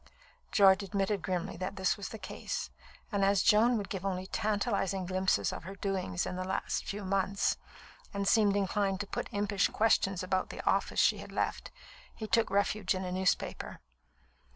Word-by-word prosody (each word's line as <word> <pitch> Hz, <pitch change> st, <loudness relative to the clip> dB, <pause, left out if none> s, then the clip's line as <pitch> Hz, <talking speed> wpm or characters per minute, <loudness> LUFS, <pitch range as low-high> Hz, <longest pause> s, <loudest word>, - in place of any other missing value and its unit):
George 195 Hz, -1 st, +6 dB
admitted 200 Hz, 0 st, -1 dB
grimly 180 Hz, -2 st, -3 dB
that 185 Hz, +2 st, -4 dB
this 190 Hz, -2 st, +1 dB
was 200 Hz, -2 st, -6 dB
the 220 Hz, -, -7 dB
case, 190 Hz, -, -5 dB, 0.4 s
and 200 Hz, -2 st, +1 dB
as 195 Hz, -1 st, +3 dB
Joan 230 Hz, +3 st, +5 dB
would 205 Hz, -, -3 dB
give 190 Hz, -2 st, -5 dB
only 185 Hz, -1 st, -2 dB
tantalising 200 Hz, -2 st, -1 dB
glimpses 185 Hz, -, +1 dB
of -, -, -7 dB
her 190 Hz, +3 st, -7 dB
doings 190 Hz, -, -2 dB
in -, -, -4 dB
the 185 Hz, -, -2 dB
last 190 Hz, +1 st, -2 dB
few 200 Hz, 0 st, -5 dB
months, 195 Hz, +1 st, +1 dB, 0.5 s
and 200 Hz, 0 st, -2 dB
seemed 205 Hz, -1 st, +4 dB
inclined 195 Hz, -1 st, 0 dB
to -, -, -3 dB
put -, -, -4 dB
impish 205 Hz, -1 st, +1 dB
questions 195 Hz, -4 st, +2 dB
about 185 Hz, 0 st, 0 dB
the -, -, -7 dB
office -, -, +1 dB
she -, -, +4 dB
had -, -, -9 dB
left, -, -, -2 dB, 0.5 s
he 220 Hz, -, -5 dB
took 225 Hz, +1 st, +2 dB
refuge 200 Hz, -1 st, +1 dB
in 185 Hz, 0 st, -3 dB
a 180 Hz, -, -3 dB
newspaper. 185 Hz, 0 st, -1 dB
195 Hz, 175 wpm, -31 LUFS, 185-205 Hz, 0.5 s, George